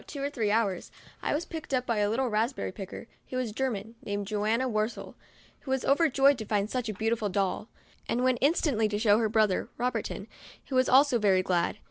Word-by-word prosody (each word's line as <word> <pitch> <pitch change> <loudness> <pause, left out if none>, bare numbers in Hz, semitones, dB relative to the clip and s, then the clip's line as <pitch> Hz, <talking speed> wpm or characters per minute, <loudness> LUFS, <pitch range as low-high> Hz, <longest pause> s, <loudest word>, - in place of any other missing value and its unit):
11 - - -23
two 280 -2 -6
or 285 - -1
three 220 -6 -1
hours, 205 -4 0 0.3
I - - 0
was 315 - -2
picked 315 -4 -4
up 250 0 -1
by 230 -4 0
a 205 0 +2
little 255 +4 0
raspberry 225 +2 -1
picker, 195 +3 -8 0.2
who 255 - -3
was 250 -4 -2
a - - -12
German, 225 -3 -3
named 205 0 -3
Johanna 215 +5 0
Worstel, 215 -1 -2 0.5
who 275 - -11
was 265 -1 0
over 310 +4 +4
joyed 275 0 +4
to 220 - -5
find 205 0 -1
such 250 -3 -2
a - - -2
beautiful 220 0 0
doll, 195 +2 -1 0.4
and 245 +2 0
went 255 -2 +2
instantly 280 -7 +2
to 210 -1 -2
show 210 0 +4
her 220 -2 +1
brother, 215 -3 +1
Ro 250 +1 0
bertin, - - -4 0.4
who 265 - -2
was 255 0 +3
also 265 -1 +5
very 190 -3 +3
glad. 180 +1 0
225 Hz, 225 wpm, -28 LUFS, 210-260 Hz, 0.5 s, also